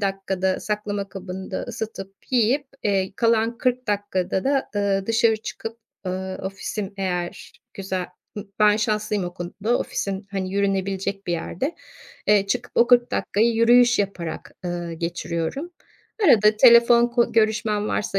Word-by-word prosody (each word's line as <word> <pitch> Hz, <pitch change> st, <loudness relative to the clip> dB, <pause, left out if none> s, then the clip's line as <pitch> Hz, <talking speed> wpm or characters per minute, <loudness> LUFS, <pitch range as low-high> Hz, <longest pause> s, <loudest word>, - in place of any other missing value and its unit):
dakikada 190 Hz, -1 st, -1 dB
saklama 205 Hz, -1 st, -3 dB
kabında 190 Hz, 0 st, -6 dB
ısıtıp 210 Hz, -4 st, -6 dB, 0.2 s
yiyip, 255 Hz, +4 st, +2 dB, 0.2 s
eee, 195 Hz, -2 st, 0 dB
kalan 230 Hz, 0 st, +2 dB
40 250 Hz, -1 st, 0 dB
dakikada 190 Hz, -2 st, -1 dB
da, 275 Hz, 0 st, +1 dB
eee, 195 Hz, -1 st, 0 dB
dışarı 225 Hz, -1 st, +3 dB
çıkıp, 225 Hz, +1 st, -7 dB, 0.3 s
eee, 185 Hz, +1 st, -3 dB
ofisim 195 Hz, +1 st, -4 dB
eğer 180 Hz, -2 st, -3 dB, 0.2 s
güzel 190 Hz, -2 st, -3 dB, 0.3 s
ımm, 205 Hz, -1 st, -7 dB
ben 210 Hz, 0 st, +5 dB
şanslıyım 210 Hz, -2 st, -1 dB
o 175 Hz, 0 st, -6 dB
konuda, 195 Hz, +6 st, -2 dB
ofisin, 195 Hz, 0 st, -3 dB
hani, 190 Hz, -1 st, -3 dB
yürünebilecek 195 Hz, 0 st, -1 dB
bir 175 Hz, -, 0 dB
yerde, 180 Hz, -, -3 dB, 0.5 s
eee, 205 Hz, -1 st, +4 dB
çıkıp 245 Hz, +4 st, -2 dB
o 235 Hz, -, +5 dB
40 245 Hz, -1 st, +4 dB
dakikayı 215 Hz, +3 st, +1 dB
yürüyüş 240 Hz, +1 st, +5 dB
yaparak, 185 Hz, -5 st, -3 dB
ııı, 175 Hz, -1 st, -3 dB
geçiriyorum. 170 Hz, -, -3 dB, 0.5 s
Arada 215 Hz, -, +6 dB
telefon 235 Hz, 0 st, +7 dB
ko 235 Hz, -1 st, +1 dB
görüşmem 215 Hz, -1 st, +1 dB
varsa 195 Hz, -1 st, -1 dB
205 Hz, 135 wpm, -23 LUFS, 190-230 Hz, 0.5 s, telefon